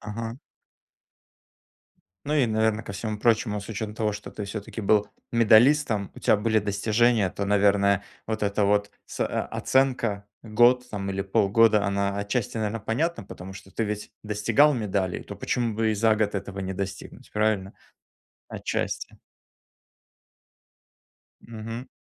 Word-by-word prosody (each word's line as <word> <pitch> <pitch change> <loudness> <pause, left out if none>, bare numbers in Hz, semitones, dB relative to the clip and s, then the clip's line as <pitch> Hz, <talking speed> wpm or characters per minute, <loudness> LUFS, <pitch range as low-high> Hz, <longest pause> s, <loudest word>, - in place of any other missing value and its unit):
Ага. 115 +3 -6 1.9
Ну, 150 - 0
и, 140 -5 +3
наверно, 110 0 +1
ко 100 - -6
всему 105 +1 -4
прочему, 110 -2 +1
с 100 - -11
учетом 105 -1 -4
того, 110 -2 0
что 105 +1 -8
ты 105 - -6
все-таки 100 +2 -6
был 105 0 +2 0.2
медалистом, 115 -1 +4
у - - -11
тебя - - +4
были 110 +1 +1
достижения, 110 +1 +2
то, 100 - -4
наверное, 100 0 +3 0.2
вот 110 -1 -1
эта 100 +1 +1
вот 100 0 +1
с - - -9
а, - - +3
а, - - -2
оценка 120 -6 0 0.2
год 120 +3 +3
там 100 -3 -4
или 95 0 -2
полгода, 105 +1 +3
она 100 0 0
отчасти, 105 +2 -2
наверное, 110 +1 -2
понятна. 145 - -1
Потому 95 -1 -9
что 95 0 -13
ты - - -2
ведь 105 -1 -4
достигал 110 +8 +3
медалей, 100 -7 -2
то - - -8
почему 120 -3 -1
бы 110 0 +1
и - - 0
за 110 +1 +3
год 105 -1 0
этого 100 0 -5
не 95 0 -3
достигнуть, 95 0 -7
правильно? 105 -2 0 0.8
Отчасти. - - -4 2.3
Мгм. 115 +2 -7
105 Hz, 145 wpm, -26 LUFS, 100-115 Hz, 2.3 s, медалистом